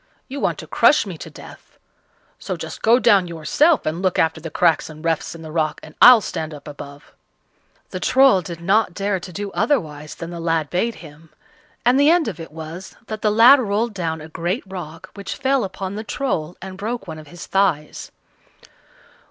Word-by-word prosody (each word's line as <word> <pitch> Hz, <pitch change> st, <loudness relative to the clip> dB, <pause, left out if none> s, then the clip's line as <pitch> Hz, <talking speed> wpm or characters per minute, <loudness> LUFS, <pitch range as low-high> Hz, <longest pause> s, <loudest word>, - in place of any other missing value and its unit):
You 280 Hz, +1 st, -6 dB
want -, -, 0 dB
to -, -, -8 dB
crush -, -, +4 dB
me -, -, -6 dB
to -, -, -8 dB
death; -, -, -14 dB, 0.6 s
so -, -, -4 dB
just -, -, -8 dB
go 230 Hz, +2 st, +5 dB
down 205 Hz, -7 st, +4 dB
yourself 175 Hz, -, +2 dB
and 160 Hz, +3 st, -2 dB
look 185 Hz, -2 st, 0 dB
after 160 Hz, 0 st, +1 dB
the 165 Hz, -, -6 dB
cracks 165 Hz, 0 st, +2 dB
and 155 Hz, +1 st, -11 dB
refts 165 Hz, 0 st, -1 dB
in 165 Hz, -, -10 dB
the 155 Hz, -, -8 dB
rock, 155 Hz, -1 st, -1 dB
and 155 Hz, -, -12 dB
I'll 245 Hz, -2 st, +9 dB
stand 155 Hz, -5 st, -5 dB
up 145 Hz, -, -13 dB
above." 145 Hz, 0 st, -11 dB, 0.8 s
The -, -, -4 dB
Troll 265 Hz, -8 st, +4 dB
did 170 Hz, -1 st, -8 dB
not 190 Hz, +1 st, +2 dB
dare 195 Hz, -1 st, -1 dB
to 180 Hz, -, -9 dB
do 200 Hz, +3 st, -5 dB
otherwise 160 Hz, -, -1 dB
than 170 Hz, 0 st, -7 dB
the 170 Hz, -, -6 dB
lad 165 Hz, -3 st, -1 dB
bade 225 Hz, +6 st, 0 dB
him, 155 Hz, +2 st, -15 dB, 0.6 s
and 250 Hz, +3 st, +4 dB
the 285 Hz, +1 st, +5 dB
end 340 Hz, -1 st, +3 dB
of 185 Hz, -7 st, -5 dB
it 165 Hz, -, -9 dB
was 160 Hz, +4 st, -9 dB
that 215 Hz, -1 st, -6 dB
the 215 Hz, -, +2 dB
lad 235 Hz, +6 st, +7 dB
rolled 220 Hz, 0 st, -1 dB
down 165 Hz, -4 st, -3 dB
a 155 Hz, -, -9 dB
great 175 Hz, -, -3 dB
rock, 180 Hz, -2 st, -9 dB
which 200 Hz, -1 st, -6 dB
fell 270 Hz, 0 st, +1 dB
upon 190 Hz, 0 st, -5 dB
the 215 Hz, +2 st, -5 dB
Troll 180 Hz, -, -3 dB
and 190 Hz, 0 st, -8 dB
broke 220 Hz, 0 st, -4 dB
one 160 Hz, -1 st, -7 dB
of 155 Hz, -, -13 dB
his 175 Hz, +2 st, -10 dB
thighs. 180 Hz, -6 st, -1 dB
180 Hz, 200 wpm, -21 LUFS, 160-220 Hz, 0.8 s, I'll